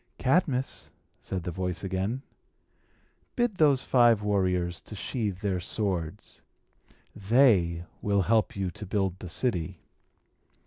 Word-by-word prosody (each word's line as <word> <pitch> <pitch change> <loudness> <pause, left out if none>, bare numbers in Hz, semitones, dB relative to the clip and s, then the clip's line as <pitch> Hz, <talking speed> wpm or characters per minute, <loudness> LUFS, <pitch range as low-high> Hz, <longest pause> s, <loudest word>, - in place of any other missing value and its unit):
"Cadmus," 135 -2 0 0.3
said 95 -2 -4
the 90 - -3
voice 90 0 -3
again, 95 +7 -2 1.1
"bid 240 -5 0
those 145 -4 +4
five 120 -4 +4
warriors 90 -4 0
to 105 - -10
sheathe 105 -2 -3
their 95 -3 0
swords. 90 -4 -3 0.7
They 100 -6 +3 0.2
will 100 -1 +2
help 110 +2 +2
you 95 -2 -2
to 105 +1 -9
build 95 -2 -1
the 90 - -7
city." 90 -5 -1
100 Hz, 120 wpm, -28 LUFS, 90-120 Hz, 1.1 s, those